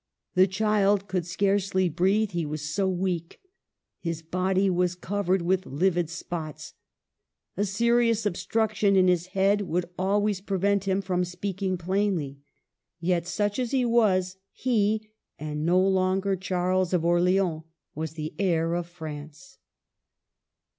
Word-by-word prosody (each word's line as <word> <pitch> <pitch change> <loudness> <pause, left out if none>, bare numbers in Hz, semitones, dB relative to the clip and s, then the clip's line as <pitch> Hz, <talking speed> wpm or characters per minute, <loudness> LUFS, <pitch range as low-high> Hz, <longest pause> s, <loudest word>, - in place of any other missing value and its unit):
The 185 0 +5
child 200 0 +2
could 180 -3 -2
scarcely 195 +1 +1
breathe, 190 +6 +1
he 170 -2 -1
was 150 0 -4
so 190 +2 +1
weak. 180 -2 -2 0.6
His 165 -2 -4
body 185 +3 +1
was 180 -1 +1
covered 190 0 -1
with 185 +2 0
livid 175 +2 +1
spots. 165 -2 -6 0.8
A 205 - 0
serious 230 +2 +2
obstruction 210 +1 +1
in 185 -1 +5
his 180 -1 +2
head 200 +2 +3
would 180 -2 -1
always 200 +1 +1
prevent 200 0 0
him 195 0 +1
from 180 -1 0
speaking 185 +1 -3
plainly. 175 -6 -1 0.6
Yet, 170 0 0
such 205 +4 -1
as 250 -2 -1
he 260 -1 +1
was, 190 -6 +2
he, 215 -3 0 0.3
and 150 +1 -3
no 180 +2 +4
longer 190 +1 +2
Charles 185 0 0
of 170 -2 +1
Orleans, 175 -1 +2 0.3
was 160 +1 -4
the 155 -1 -5
heir 170 -4 +1
of 175 -1 -2
France. 155 - -9
185 Hz, 135 wpm, -26 LUFS, 175-200 Hz, 0.8 s, The